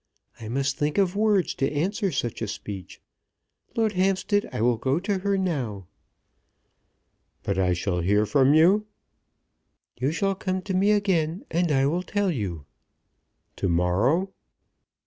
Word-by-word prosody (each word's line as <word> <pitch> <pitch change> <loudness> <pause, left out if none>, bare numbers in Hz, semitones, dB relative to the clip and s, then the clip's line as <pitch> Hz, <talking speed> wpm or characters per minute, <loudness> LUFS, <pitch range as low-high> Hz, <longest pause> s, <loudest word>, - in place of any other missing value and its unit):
I 110 - -8
must 135 +5 -1
think 150 0 0
of 195 -2 +2
words 205 -4 +2
to 135 - -1
answer 190 +6 -1
such 120 -7 -3
a 115 - -1
speech. 100 -3 -7 0.8
Lord 225 -2 +2
Hampstead, 195 +2 +1
I - - -4
will 120 +1 +2
go 135 +6 0
to 195 +1 -1
her 200 +1 0
now." 130 - -2 1.6
"But 100 -1 -1
I 90 -1 +2
shall 90 +1 -1
hear 105 +4 +2
from 140 +4 +4
you." 195 +7 +4 1.1
"You 130 +4 +1
shall 195 +4 0
come 185 -1 -3
to 190 - -4
me 190 +3 +3
again, 190 -5 +1
and 170 0 +1
I 135 -1 +3
will 165 +6 0
tell 200 0 -1
you." 95 - -4 0.9
"To 95 - -1
morrow?" 105 - +1
160 Hz, 145 wpm, -25 LUFS, -, 1.6 s, from